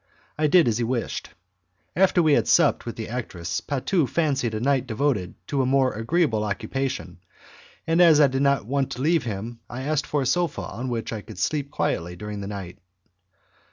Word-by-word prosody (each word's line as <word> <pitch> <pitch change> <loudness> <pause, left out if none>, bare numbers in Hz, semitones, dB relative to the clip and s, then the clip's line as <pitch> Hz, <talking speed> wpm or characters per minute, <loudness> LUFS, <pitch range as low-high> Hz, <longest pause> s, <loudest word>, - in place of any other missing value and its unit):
I 155 0 +1
did 170 0 +5
as 115 0 +1
he - - +1
wished. 120 0 -3 0.7
After 180 -1 +4
we 155 -2 +4
had - - +3
supped 165 -7 +3
with 115 - -4
the 110 - -5
actress, 95 -8 -4
Patu 145 +1 0
fancied 135 -8 0
a - - -2
night 135 +1 +1
devoted 110 -6 -1
to 140 +6 0
a - - +1
more 130 -1 +3
agreeable 115 0 +1
occupation, 130 +6 -3 0.7
and 165 +2 +3
as 165 -4 +7
I 150 - +7
did 135 0 0
not 140 -5 +2
want 135 +2 0
to 125 - -6
leave 160 -3 +2
him 115 +2 -5
I 130 +2 -6
asked 145 0 -1
for 145 -2 0
a - - -3
sofa 175 +3 0
on 120 +6 -5
which 115 -1 -3
I 110 - -4
could - - -12
sleep 145 -2 -1
quietly 90 - -2
during 105 +2 -6
the 100 - -5
night. 95 -2 -7
130 Hz, 195 wpm, -24 LUFS, 110-145 Hz, 0.7 s, as